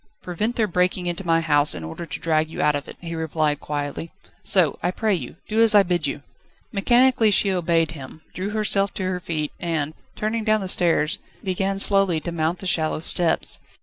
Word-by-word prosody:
"Prevent 210 +7 -3
their 225 - +1
breaking 180 -1 -1
into 175 +2 -4
my 165 0 +2
house 145 - +3
in 85 - -7
order 80 - -8
to - - -6
drag 160 -1 0
you - - -9
out 150 - +2
of 145 - -5
it," - - -9
he 170 -1 -7
replied 155 -2 -1
quietly; 145 +2 -5 0.3
"so, 175 -7 +3
I - - 0
pray 215 +3 -1
you, 175 - -5
do 220 +1 +1
as 225 -2 +6
I 205 - +7
bid 175 -5 -1
you." 140 +1 -5 0.5
Mechanically 240 +2 +3
she 200 0 +2
obeyed 170 -3 0
him, 155 +1 -11
drew 190 +2 -4
herself 210 -2 +1
to 190 - -4
her 185 -1 -2
feet, 155 -4 -4
and, 160 -4 -3 0.2
turning 220 +1 -2
towards 215 -1 +1
the 190 - -4
stairs, 170 -4 +2 0.2
began 195 +1 -2
slowly 195 -4 +4
to 170 - -5
mount 165 +1 -2
the 190 - -10
shallow 160 -3 +1
steps. 165 +1 +3
175 Hz, 205 wpm, -22 LUFS, 155-195 Hz, 0.5 s, I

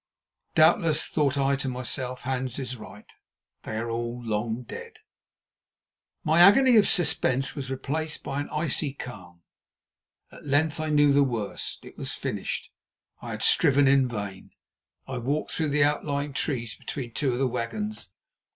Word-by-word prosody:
Doubtless, 160 0 +4
thought 145 -2 +1
I 140 0 +2
to 135 -1 -3
myself, 125 0 -4
Hans 130 -1 -2
is 130 -2 -4
right. 105 -2 -12 0.6
They 110 - -5
are 115 +1 -3
all 120 +1 -3
long 110 +2 -2
dead. - - -9 1.3
My 160 +2 +3
agony 240 +8 +7
of 210 - +6
suspense 135 -6 +1
was 135 -3 -5
replaced 155 +4 -3
by 140 0 -3
an 145 - -4
icy 150 -2 -1
calm. 90 -11 -10 0.9
At - - -13
length 145 +2 +1
I 155 0 -2
knew 145 -1 +5
the 145 - +5
worst. 120 -7 -3
It - - -13
was - - -4
finished—I - - -7
had - - -4
striven 140 0 +5
in 135 -1 +5
vain. 100 -5 -6 0.5
I 130 -2 -4
walked 140 +6 -2
through 155 -2 -1
the 145 0 +3
outlying 145 -1 0
trees 120 -5 -2
and - - -21
between 120 -5 -5
two 130 +1 0
of - - -2
the 135 - +1
wagons. 125 - -4
135 Hz, 155 wpm, -26 LUFS, 120-150 Hz, 1.3 s, agony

